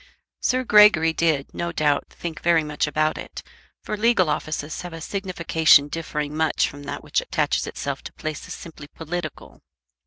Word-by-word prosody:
Sir 255 0 +1
Gregory 210 -8 +6
did, 160 -4 0
no 170 0 -3
doubt, 150 -3 +1
think 165 -2 -7
very 170 -2 +3
much 150 0 -1
about 155 +1 0
it; - - -8 0.4
for - - -3
legal 210 -7 +3
offices 155 0 -3
have 175 -1 -8
a 165 - -7
signification 165 -5 +3
differing 150 -2 -4
much 160 0 +2
from 145 - -10
that 145 0 -6
which - - 0
attaches - - -1
itself - - -4
to - - -8
places 155 -1 -6
simply 155 -3 -11
political. 160 0 -7
160 Hz, 160 wpm, -23 LUFS, 150-175 Hz, 0.4 s, Gregory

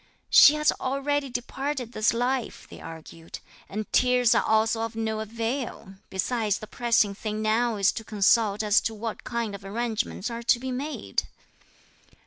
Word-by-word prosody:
"She 295 - +9
has 300 0 +3
already 275 +1 -1
departed 255 +1 -4
this 215 -2 +2
life," 245 +1 -2
they - - -12
argued, 165 0 -10 0.3
"and 215 +2 -4
tears 250 -2 +4
are 235 - +3
also 220 +1 +2
of 225 0 -4
no 220 -1 -2
avail, 230 -1 -4 0.2
besides 210 +2 -1
the - - -8
pressing 230 -3 +1
thing 215 +1 -4
now 225 +2 +1
is 200 -1 +3
to 225 - -7
consult 210 0 +2
as 210 0 +4
to 225 - -3
what 220 +1 -5
kind 235 -3 -3
of 200 0 -8
arrangements 220 +1 -3
are 235 0 -5
to 235 0 +3
be 260 +1 -4
made." 280 +5 -3
230 Hz, 160 wpm, -26 LUFS, 215-245 Hz, 0.3 s, She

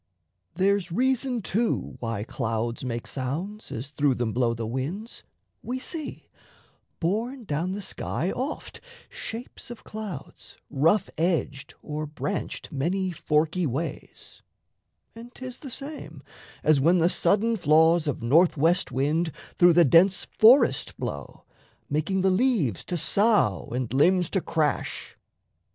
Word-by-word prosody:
There's 195 -2 +1
reason, 250 +2 0
too, 225 +5 -1
Why 115 -3 -3
clouds 115 0 -3
make 120 -2 -3
sounds, 165 - -5
as 130 +5 -6
through 145 -3 +1
them 120 -3 -2
blow 120 -1 +1
the 115 0 -4
winds: 145 - -4 0.4
We 250 +2 -4
see, 310 +3 -6 0.7
borne 230 +9 -2
down 170 +1 -2
the 205 +1 -5
sky, 180 0 -3
oft 270 +5 -5 0.3
shapes 230 +1 -8
of 240 - -9
clouds 210 -10 -8
Rough 165 +8 +2
edged 150 -5 -1
or 150 0 -4
branched 155 +5 -4
many 180 +7 -1
forky 160 +1 0
ways; 140 +6 -6 0.7
And 235 +1 -11
'tis 255 -1 -8
the 275 - -8
same, 285 +4 -8 0.4
as 155 -3 +4
when 170 +6 +4
the 170 -1 +4
sudden 215 +5 +2
flaws 160 -1 +4
Of 140 -5 -2
north 160 +8 +4
west 170 +6 +2
wind 155 +5 0 0.2
through 175 -1 +6
the 170 +1 +6
dense 175 +6 +5
forest 230 - +5
blow, 70 -1 -6 0.5
Making 160 +6 0
the 190 0 +3
leaves 185 - +1
to 175 - -2
sough 200 - +2
and 125 -1 -3
limbs 175 +5 +3
to 190 - +1
crash. 155 -4 -2
170 Hz, 135 wpm, -26 LUFS, 140-210 Hz, 0.7 s, through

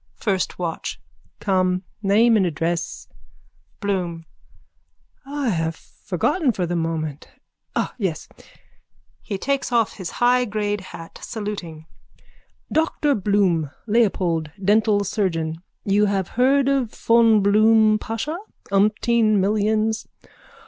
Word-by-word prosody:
FIRST 195 -4 -1
WATCH: 170 -2 -4 0.4
Come. 185 -2 +1 0.2
Name 220 +3 +4
and 205 - +4
address. 170 0 -2 0.7
BLOOM: 180 -5 -2 1.0
I 285 -2 -2
have 165 -4 -1
forgotten 295 - -1
for 185 -3 -1
the 175 +1 -2
moment. 160 -3 -3 0.5
Ah, - - -1
yes! 185 -7 -2 0.9
(He 200 - -4
takes 275 +4 -1
off 230 -3 +1
his 185 -4 -5
high 250 +1 +3
grade 210 -2 -2
hat, 165 -2 -11
saluting.) 190 -8 -6 0.9
Dr 315 -2 +1
Bloom, 195 - +1 0.2
Leopold, 185 -8 +1
dental 205 +1 +3
surgeon. 165 -5 -2 0.2
You 205 +1 +3
have 195 -2 -1
heard 265 +3 +3
of 270 -5 +1
von 230 -2 +4
Blum 215 +1 +4
Pasha. 260 +12 -4 0.3
Umpteen 215 +2 +3
millions. 215 +2 +1
205 Hz, 105 wpm, -22 LUFS, 180-225 Hz, 1.0 s, Name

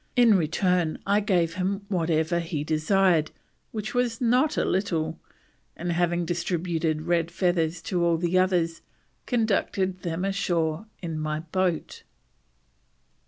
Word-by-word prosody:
In 240 -4 +6
return 175 0 +1
I 200 +1 +3
gave 180 -6 +1
him 195 +2 -2
whatever 165 -2 +1
he 165 -3 -3
desired, 160 +1 +2 0.4
which 215 +1 -4
was 245 -2 0
not 250 +5 +2
a - - +2
little, 165 -4 -1 0.6
and 175 +1 -2
having 175 0 +1
distributed 165 -2 -1
red 170 -1 +1
feathers 175 -2 0
to 175 -2 -1
all 170 -1 +3
the 175 +2 -1
others, 180 -3 +2 0.5
conducted 200 -5 0
them 170 +2 -2
ashore 175 -2 -1 0.2
in 165 -2 -3
my 155 0 -2
boat." 175 0 -2
175 Hz, 125 wpm, -26 LUFS, 165-195 Hz, 0.6 s, In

